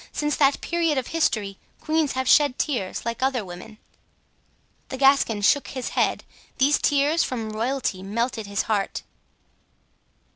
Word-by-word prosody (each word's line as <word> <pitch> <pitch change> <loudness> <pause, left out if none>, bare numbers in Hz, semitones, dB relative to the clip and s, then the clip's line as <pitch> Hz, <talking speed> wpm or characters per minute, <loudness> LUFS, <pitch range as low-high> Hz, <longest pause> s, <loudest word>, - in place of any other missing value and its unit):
Since 295 -1 -1
that 275 -1 +3
period 335 -4 0
of 260 - -2
history 215 -12 0 0.2
queens 310 -2 0
have 260 0 -2
shed 290 -3 +4
tears, 225 -11 -2
like 230 +1 -3
other 260 -5 0
women. 185 +5 -10 1.1
The 265 - -5
Gascon 270 -6 +3
shook 285 +7 +3
his 255 -2 -5
head, - - 0 0.3
these 280 +3 +3
tears 290 +3 +2
from 225 -4 -4
royalty 230 -3 -2
melted 220 +2 -3
his 200 0 -1
heart. 205 -3 -2
260 Hz, 140 wpm, -24 LUFS, 215-285 Hz, 1.1 s, shed